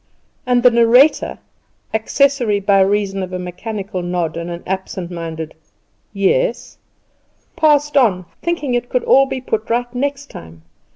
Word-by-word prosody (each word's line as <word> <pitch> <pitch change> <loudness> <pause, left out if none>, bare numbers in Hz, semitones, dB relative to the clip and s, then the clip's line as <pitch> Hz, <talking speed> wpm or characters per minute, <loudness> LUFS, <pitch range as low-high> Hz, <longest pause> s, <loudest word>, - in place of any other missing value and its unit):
And 245 -1 +2
the 250 - +7
narrator 235 +5 +4 0.6
accessory 240 -1 +1
by 195 0 +3
reason 195 0 0
of 185 -1 -5
a - - -2
mechanical 190 +2 -5
nod 175 -2 -2
and 170 +1 -5
an 170 0 -7
absent 190 -1 -4
minded 160 -2 -6 0.6
"Yes" 210 - 0 0.8
passed 295 -3 +2
on, 205 -10 +3 0.2
thinking 335 -7 -2
it 245 0 -1
could 250 - 0
all 270 0 +5
be 265 -1 -4
put 220 -3 -3
right 240 +1 -1
next 280 +2 -3
time. 80 -1 -12
220 Hz, 140 wpm, -18 LUFS, 180-260 Hz, 0.8 s, the